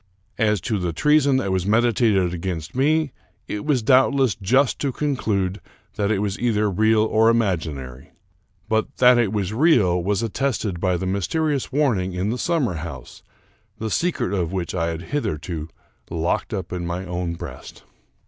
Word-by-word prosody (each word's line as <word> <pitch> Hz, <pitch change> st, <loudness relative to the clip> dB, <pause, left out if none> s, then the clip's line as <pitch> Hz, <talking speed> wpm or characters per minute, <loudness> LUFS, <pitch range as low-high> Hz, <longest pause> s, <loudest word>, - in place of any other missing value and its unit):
As 105 Hz, -2 st, +2 dB
to 105 Hz, +3 st, -1 dB
the 90 Hz, -2 st, -2 dB
treason 145 Hz, -, +3 dB
that 100 Hz, -7 st, -1 dB
was 95 Hz, 0 st, 0 dB
medi 120 Hz, +3 st, +4 dB
tated 100 Hz, -6 st, +2 dB
against 85 Hz, -2 st, -4 dB
me, 150 Hz, +3 st, +2 dB, 0.4 s
it 105 Hz, -, -4 dB
was 140 Hz, -6 st, +1 dB
doubtless 130 Hz, -1 st, +4 dB
just 125 Hz, +9 st, +1 dB
to 140 Hz, -, -1 dB
conclude 105 Hz, -10 st, -1 dB, 0.3 s
that 100 Hz, -1 st, 0 dB
it 110 Hz, -, +2 dB
was 100 Hz, -1 st, -2 dB
either 105 Hz, -4 st, +1 dB
real 110 Hz, +3 st, +3 dB
or 110 Hz, +1 st, +3 dB
imaginary; 80 Hz, -, -2 dB, 0.6 s
but 110 Hz, 0 st, -1 dB
that 125 Hz, -1 st, +6 dB
it 110 Hz, -5 st, +1 dB
was 105 Hz, -2 st, -2 dB
real 110 Hz, -, +3 dB
was 100 Hz, +4 st, 0 dB
at 115 Hz, -, -3 dB
tested 115 Hz, -9 st, -1 dB
by 90 Hz, -1 st, +1 dB
the 95 Hz, -, -4 dB
mysterious 135 Hz, -, -1 dB
warning 120 Hz, -11 st, +1 dB
in 95 Hz, +4 st, -1 dB
the 125 Hz, -, -3 dB
summer 160 Hz, -, 0 dB
house, 75 Hz, -6 st, -8 dB, 0.6 s
the 110 Hz, 0 st, -4 dB
secret 170 Hz, -, 0 dB
of 90 Hz, -4 st, -1 dB
which 90 Hz, -3 st, -3 dB
I 85 Hz, -2 st, 0 dB
had 85 Hz, 0 st, -4 dB
hitherto 80 Hz, -, -3 dB, 0.4 s
locked 85 Hz, +1 st, -1 dB
up 95 Hz, -5 st, -4 dB
in 90 Hz, -1 st, -3 dB
my 90 Hz, +2 st, -3 dB
own 90 Hz, -1 st, -3 dB
breast. -, -, -10 dB
105 Hz, 170 wpm, -22 LUFS, 90-125 Hz, 0.6 s, that